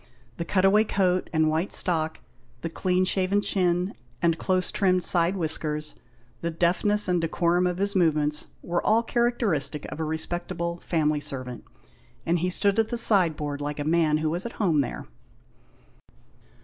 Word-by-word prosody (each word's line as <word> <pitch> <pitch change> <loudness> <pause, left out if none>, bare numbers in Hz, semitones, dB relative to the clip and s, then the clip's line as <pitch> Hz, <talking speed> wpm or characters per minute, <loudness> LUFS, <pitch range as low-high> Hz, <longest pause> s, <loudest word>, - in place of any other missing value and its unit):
The 170 - -4
cut 190 +1 +1
away 210 +3 +5
coat, 185 -4 0
and 160 -1 +2
white 160 +5 -1
stock, 160 -4 +2 0.4
the 165 - -4
clean 185 +2 0
shaven 190 +2 +1
chin, 180 -2 0 0.3
and 170 -1 +2
close 185 -1 0
trimmed 185 -3 +2
side 175 +1 +4
whiskers, 155 -3 -1 0.5
the 170 - -3
deftness 180 +5 +2
and 180 -2 +1
decorum 170 +2 +1
of 180 0 -2
his 200 +2 -1
movements 150 -4 +1 0.2
were 175 0 -2
all 225 +2 +3
characteristic 225 - 0
of - - -7
a - - -1
respectable 170 +2 -4
family 155 -3 0
servant, 130 -4 -7 0.6
and 170 +1 +1
he 180 +2 -1
stood 200 +3 +1
at 220 - +2
the 240 - -3
sideboard 160 -10 +1
like 145 0 -4
a - - -1
man 155 -1 +2
who 155 0 -1
was 175 +3 -2
at 235 - -6
home 165 -9 +1
there. 125 - -5
175 Hz, 160 wpm, -25 LUFS, 155-190 Hz, 0.6 s, away